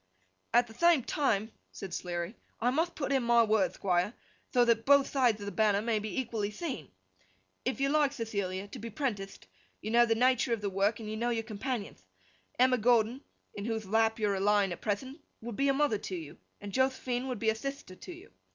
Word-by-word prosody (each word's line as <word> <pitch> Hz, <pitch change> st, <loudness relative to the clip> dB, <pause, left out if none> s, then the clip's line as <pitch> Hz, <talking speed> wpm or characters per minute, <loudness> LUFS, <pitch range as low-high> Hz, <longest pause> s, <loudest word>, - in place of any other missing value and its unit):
'At 240 Hz, +1 st, +5 dB
the 225 Hz, -, -14 dB
thame 340 Hz, -1 st, +4 dB
time,' 225 Hz, -7 st, 0 dB, 0.2 s
said 190 Hz, -3 st, -8 dB
Sleary, 175 Hz, +4 st, -4 dB, 0.2 s
'I 245 Hz, +2 st, +2 dB
mutht 325 Hz, +6 st, 0 dB
put 280 Hz, -2 st, -3 dB
in 270 Hz, -1 st, +3 dB
my 235 Hz, 0 st, +4 dB
word, 215 Hz, -4 st, +2 dB
Thquire, 185 Hz, +3 st, 0 dB, 0.4 s
tho 245 Hz, -1 st, +4 dB
that 230 Hz, -1 st, +2 dB
both 280 Hz, +1 st, +5 dB
thides 245 Hz, -6 st, +2 dB
of -, -, -5 dB
the 200 Hz, -, -4 dB
banner 210 Hz, -2 st, +2 dB
may 220 Hz, 0 st, 0 dB
be 215 Hz, +5 st, -3 dB
equally 225 Hz, -5 st, -2 dB
theen. 210 Hz, -, -5 dB, 0.8 s
If -, -, -1 dB
you 275 Hz, -, +2 dB
like, 295 Hz, -1 st, +3 dB
Thethilia, 200 Hz, -6 st, -3 dB
to -, -, -7 dB
be 230 Hz, -, -6 dB
prentitht, 205 Hz, -6 st, -4 dB, 0.3 s
you 215 Hz, -, -5 dB
know 240 Hz, +1 st, +5 dB
the 225 Hz, -, +2 dB
natur 250 Hz, 0 st, +3 dB
of 225 Hz, -, -2 dB
the 200 Hz, -1 st, -2 dB
work 200 Hz, +3 st, +1 dB
and 220 Hz, -, -7 dB
you 215 Hz, 0 st, -4 dB
know 235 Hz, +2 st, 0 dB
your 230 Hz, -1 st, -1 dB
companionth. 215 Hz, -, -5 dB, 0.5 s
Emma 255 Hz, 0 st, +4 dB
Gordon, 235 Hz, +2 st, +3 dB, 0.3 s
in 200 Hz, -, -6 dB
whothe 225 Hz, -2 st, -2 dB
lap 225 Hz, +2 st, +2 dB
you're 210 Hz, -2 st, +1 dB
a 195 Hz, -, -1 dB
lying 200 Hz, -1 st, +3 dB
at 175 Hz, -, -6 dB
prethent, 260 Hz, +8 st, -3 dB, 0.2 s
would 235 Hz, -1 st, -7 dB
be 275 Hz, +4 st, +1 dB
a -, -, +5 dB
mother 270 Hz, -7 st, +1 dB
to 185 Hz, -, -5 dB
you, 160 Hz, -4 st, -8 dB, 0.2 s
and 205 Hz, -1 st, -8 dB
Joth'phine 260 Hz, -1 st, 0 dB
would 250 Hz, -3 st, -3 dB
be 220 Hz, +1 st, +2 dB
a -, -, -1 dB
thithter 275 Hz, -5 st, -6 dB
to -, -, -9 dB
you. 360 Hz, +3 st, -12 dB
225 Hz, 215 wpm, -30 LUFS, 205-255 Hz, 0.8 s, At